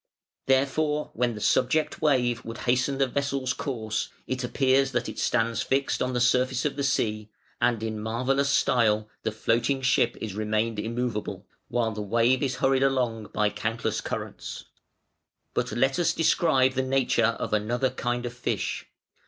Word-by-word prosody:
Therefore 150 +3 +1
when 120 -1 0
the - - -6
subject 130 +8 +1
wave 125 -6 +2
would 115 0 -7
hasten 130 +2 +1
the 135 - +3
vessel's 135 -1 -1
course, 110 -6 -3 0.2
it 130 0 -3
appears 135 +2 +2
that - - 0
it - - -6
stands 115 -2 +1
fixed 135 +1 0
on 125 0 0
the 125 - 0
surface 125 +1 +2
of 150 - 0
the 140 - -3
sea: 110 -5 0 0.3
and 115 -3 +2
in 110 -1 -3
marvellous 130 +6 0
style 110 -6 +2
the 110 - -1
floating 120 +5 0
ship 120 -2 +2
is 110 -3 -5
retained 110 +1 -1
immovable, 115 0 -3 0.2
while 115 -2 0
the 105 -1 -5
wave 115 +5 +2
is 135 -3 0
hurried 135 0 +2
along 125 -5 +1
by 105 -1 +1
countless 110 +2 -2
currents. - - -6 0.9
"But - - -1
let 135 +6 +1
us 175 - +2
describe 135 -5 +3
the 130 - 0
nature 130 -3 +1
of - - -4
another 120 +5 +1
kind 120 0 -2
of 120 - -4
fish. 120 - -3
125 Hz, 160 wpm, -26 LUFS, 115-135 Hz, 0.9 s, the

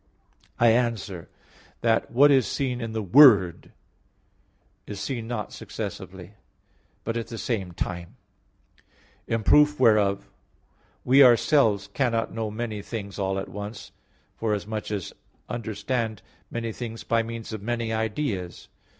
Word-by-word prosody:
I 120 - +6
answer 110 -7 -1 0.5
that, 115 -1 +1
What 140 +5 +5
is 135 -4 +4
seen 125 -3 -2
in 115 -1 -4
the 110 -1 -2
Word 100 - +6 1.2
is 105 -2 -6
seen 115 +1 -4
not 115 -3 -4
successively, 95 -3 -7 0.7
but 115 +1 -2
at 115 - -4
the 115 - -7
same 100 -7 -3
time. 85 0 -5 1.1
In 115 -1 -1
proof 150 +4 +5
whereof, 105 -5 +3 0.8
we 135 +3 +7
ourselves 120 -4 +4
cannot 115 -4 -1
know 110 -1 -3
many 110 -1 -4
things 100 -2 -7
all 95 0 -1
at 95 - -4
once, 100 +3 -8 0.5
forasmuch 105 0 -2
as 100 -4 -4 0.3
understand 115 -1 -3 0.3
many 115 -1 -3
things 115 0 -7
by 115 0 +1
means 115 0 -7
of 110 - -5
many 115 0 -2
ideas. 110 -5 -3
110 Hz, 125 wpm, -25 LUFS, 100-120 Hz, 1.2 s, we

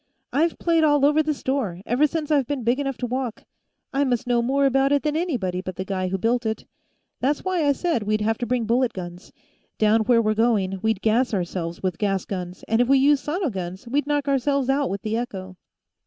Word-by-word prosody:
"I've 325 +3 +1
played 330 -2 +2
all 290 -2 +4
over 300 +2 +4
the 310 0 0
store, 260 -11 -2
ever 260 +6 +3
since 310 0 -3
I've 280 -5 +3
been 285 -4 -3
big 240 +4 +1
enough 275 -2 -2
to 250 - -3
walk; 250 -1 -3 0.5
I 275 +1 +2
must 245 -4 0
know 240 -1 +2
more 275 +4 +1
about 270 +1 +3
it 285 -1 +2
than 300 -1 0
anybody 235 - -1
but 185 -1 -6
the 185 - -4
guy 185 -1 -2
who 190 +1 -1
built 235 +5 +1
it. 220 -1 -3 0.5
That's 285 +5 0
why 370 -3 0
I - - +5
said 325 -3 -1
we'd 215 +1 0
have 220 +1 0
to 240 - -2
bring 245 -1 0
bullet 240 +2 +1
guns; 175 0 -8 0.5
down 215 +1 +3
where 235 0 +4
we're 215 -1 +2
going, 210 -4 +1
we'd 220 -3 0
gas 225 +1 +2
ourselves 175 -1 -4
with 185 -3 -2
gas 195 -2 0
guns, 180 -2 -6
and 225 +2 +2
if 245 - +2
we 275 +1 +5
used 280 +1 +3
sono 330 -1 -1
guns, 185 +2 -6
we'd 285 +4 0
knock 290 -1 0
ourselves 275 0 +1
out 280 0 +1
with 195 0 -4
the 220 0 -1
echo." 190 -6 -5
245 Hz, 230 wpm, -23 LUFS, 205-280 Hz, 0.5 s, I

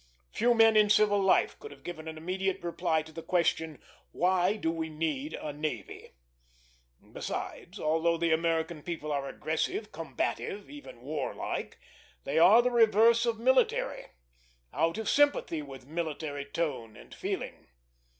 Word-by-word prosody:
Few 240 +1 +2
men 225 -1 +6
in 210 -1 +5
civil 205 -1 +4
life 190 - +2
could 440 - -9
have - - -15
given 160 -2 -7
an 160 0 -6
immediate 190 +3 -2
reply 170 -2 0
to 160 - -13
the 165 - -7
question, 160 -4 0 0.3
Why 185 +2 +2
do 165 -6 -1
we 160 -1 -3
need 165 - -3
a 150 - -5
navy? 145 - -6 1.0
Besides, 190 +4 -6
although 165 +2 +1
the 165 -1 +2
American 160 -1 0
people 155 -2 -5
are 140 -1 -2
aggressive, 160 +9 -2
combative, 165 - -4
even 290 - -11
warlike, 145 +1 -4 0.5
they 145 +4 0
are 215 +8 +7
the 250 - +1
reverse 230 0 +5
of 230 -1 0
military; 255 +3 +1 0.7
out 165 +3 +1
of 220 - -4
sympathy 285 - +2
with 135 -3 -10
military 150 -2 -4
tone 140 -8 -3
and - - -14
feeling. - - -5
165 Hz, 145 wpm, -30 LUFS, 155-210 Hz, 1.0 s, are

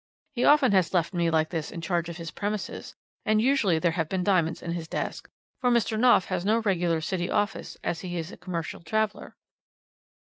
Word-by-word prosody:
He 245 -2 0
often 290 -5 +6
has 190 -2 +2
left 175 +1 +1
me 170 -1 +1
like 160 -1 +1
this 160 -4 -3
in 170 - -7
charge 170 0 -1
of 170 - -7
his 165 -2 -6
premises, 205 0 -4 0.3
and 215 0 +2
usually 225 -8 +3
there 170 +1 +2
have 165 -2 -2
been 190 -2 -1
diamonds 180 -4 +1
in 170 - -3
his 170 -1 -4
desk, - - -4 0.3
for 250 - +2
Mr. 235 -2 +2
Knopf 230 -5 +5
has 175 - -2
no 215 +3 +3
regular 175 -6 +1
City 175 +1 -2
office 205 +1 -1
as 165 - -2
he 175 -2 -4
is 165 +2 -4
a - - -11
commercial 175 -2 -5
traveller.' 215 +3 -2
180 Hz, 205 wpm, -27 LUFS, 170-215 Hz, 0.3 s, often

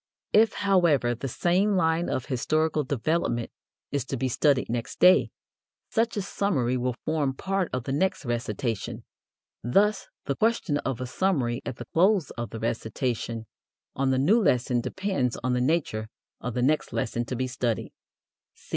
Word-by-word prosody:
If, 220 +1 +5
however, 170 -11 +3
the 120 +3 -5
same 185 - +2
line 165 0 +1
of 130 - -2
historical 155 +3 0
development 135 -2 -1 0.4
is 140 -3 0
to 135 - -3
be 130 +1 -1
studied 140 +1 +2
next 115 0 -4
day, 185 +1 +6 0.6
such 225 -1 +1
a 205 - 0
summary 145 -12 0
will 125 -1 -1
form 150 -4 0
part 190 +3 -1
of 125 -2 -2
the 135 - -4
next 185 +3 0
recitation. 115 -2 -3 0.6
Thus 195 - +2 0.2
the 140 - -1
question 215 - +1
of 130 -2 -3
a - - -2
summary 125 -5 0
at - - -3
the - - -8
close 185 -2 +3
of 120 -2 -5
the 110 - -7
recitation 115 0 -2 0.5
on 135 0 +1
the 130 - +2
new 190 - +4
lesson 125 - +2
depends 190 - -1
on 125 0 +1
the 125 - +1
nature 130 -7 0 0.3
of 125 -1 -5
the 125 - +1
next 150 +4 +1
lesson 115 +1 -1
to 125 - -4
be 130 +1 -1
studied. 125 -4 -2
135 Hz, 165 wpm, -26 LUFS, 120-175 Hz, 0.6 s, day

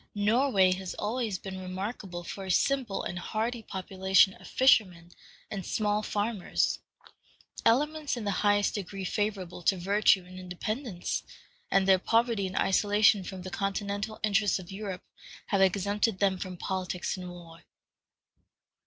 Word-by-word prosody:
Norway 205 -2 +3
has 185 0 -3
always 220 -2 -2
been 190 0 -7
remarkable 185 -1 -5
for 195 +3 -7
a - - -7
simple 245 +2 +1
and 175 - -4
hardy 225 +6 -2
population 190 -1 +2
of - - -14
fishermen 185 -10 +3 0.4
and 195 -3 -4
small 210 +3 0
farmers, 210 -1 -1 0.9
elements 295 +3 +1
in 235 - -4
the 205 - 0
highest 205 0 +3
degree 195 -1 -5
favorable 195 -3 -2
to 190 +3 +2
virtue 195 0 +3
and 185 +1 -11
independence, 185 +3 -3 0.5
and 195 0 +3
their 190 -1 +6
poverty 225 -1 +1
and 185 - -7
isolation 205 0 +4
from 185 0 -7
the 185 - -7
continental 200 +3 -3
interests 205 -2 +2
of 185 0 -10
Europe 195 -2 -5 0.4
have 195 - +1
exempted 200 +2 +2
them 190 -1 +1
from 185 -1 -6
politics 185 -1 -3
and 180 -1 -7
war. 170 -2 -12
195 Hz, 140 wpm, -29 LUFS, 185-215 Hz, 0.9 s, their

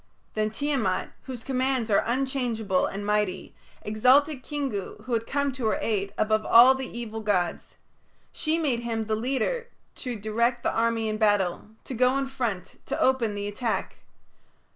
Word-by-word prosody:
Then 215 0 0
Tiamat, 230 -5 -1
whose 250 -4 -6
commands 260 -3 0
are 200 - +5
unchangeable 240 -6 0
and 200 +1 -5
mighty, 210 -3 -1 0.3
exalted 260 +7 +3
Kingu, 270 -10 -4
who 255 - -4
had 230 0 0
come 280 0 0
to 255 -3 -2
her 215 - +1
aid, 200 -3 -1
above 215 0 +2
all 240 +4 +8
the 265 -1 -4
evil 225 -2 -6
gods; 200 -5 -1 0.6
she 315 +1 -1
made 285 -8 0
him 230 -2 -2
the 215 0 0
leader 265 - -1 0.3
to 250 -3 -4
direct 235 +3 0
the - - 0
army 230 -1 +1
in 215 0 -1
battle, 205 -5 +2 0.2
to - - -7
go 250 +2 +3
in 275 - 0
front, 240 -8 -4
to - - -2
open 240 -5 +2
the 205 0 -3
attack. 220 +3 -2
230 Hz, 165 wpm, -26 LUFS, 215-260 Hz, 0.6 s, all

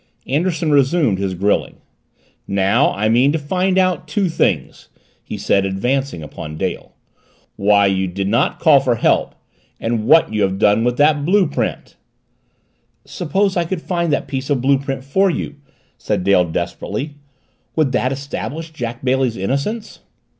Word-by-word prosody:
Anderson 160 +2 0
resumed 140 - +2
his 95 -2 -2
grilling. 100 +3 0 0.7
"Now 100 0 +2
I 105 +2 0
mean 125 +5 +4
to - - +1
find 185 +5 0
out 185 -4 +1
two 185 +4 0
things," 160 - -1 0.3
he - - -6
said, 100 - +1
advancing 120 - -1
upon 75 +1 -8
Dale. - - -4 0.6
"Why 100 0 +3
you 95 -1 +1
did 95 +2 -3
not 115 +7 +1
call 150 -4 +6
for 125 -3 +1
help - - +1 0.4
and 115 -1 -2
what 165 -8 +5
you 105 - 0
have 95 -1 +1
done 105 +3 +3
with 120 0 0
that 150 0 +3
blue 190 +5 +3
print." 150 - -4 1.1
"Suppose 195 +3 -1
I 175 - +2
could 170 0 -4
find 170 -3 -1
that 145 - -1
piece 135 0 -4
of 140 -3 +1
blue 135 +2 +2
print 135 -1 -4
for 190 +9 +2
you?" 150 -3 -4 0.4
said - - -2
Dale 95 -2 +4
desperately. 90 - -4 0.6
"Would 155 -5 +2
that 130 0 0
establish 140 +3 -5
Jack 120 -4 -6
Bailey's 130 -2 +1
innocence?" 140 - -3
135 Hz, 155 wpm, -18 LUFS, 105-160 Hz, 1.1 s, call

